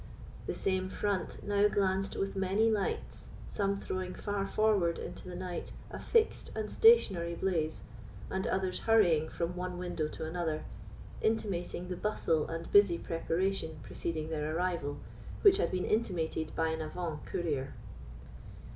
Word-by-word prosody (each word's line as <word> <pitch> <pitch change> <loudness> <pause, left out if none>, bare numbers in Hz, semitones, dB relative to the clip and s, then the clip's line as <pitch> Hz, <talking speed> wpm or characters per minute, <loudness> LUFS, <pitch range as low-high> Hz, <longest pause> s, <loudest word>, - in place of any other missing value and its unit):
The - - -2
same 190 -1 0
front 200 -2 -2
now 205 0 +4
glanced 195 -1 +1
with 195 0 -2
many 195 +4 +2
lights, 205 -3 -2 0.2
some 200 -1 0
throwing 185 -2 -4
far 205 -1 -2
forward 200 -6 +2
into 185 - -7
the 180 - -6
night 180 -1 -5 0.2
a - - -6
fixed 455 -2 +2
and 215 -1 -3
stationary 190 - +5
blaze, 165 -4 -1 0.5
and 190 0 -2
others 190 -1 0
hurrying 175 -9 +4
from 170 +1 -2
one 180 0 -4
window 175 -3 -2
to 160 - -6
another, 160 -2 -2 0.6
intimating 185 -5 -1
the 180 -1 -4
bustle 165 -7 +1
and 165 0 -5
busy 200 -4 +6
preparation 165 0 -1
preceding 160 -2 -3
their 155 0 -1
arrival, 170 -5 -1 0.5
which 395 -2 +8
had - - +1
been 185 -1 -1
intimated 170 -7 -1
by 160 0 +1
an 160 0 -2
avant 155 0 -4
courier. 145 -6 -2
180 Hz, 145 wpm, -32 LUFS, 165-200 Hz, 0.6 s, which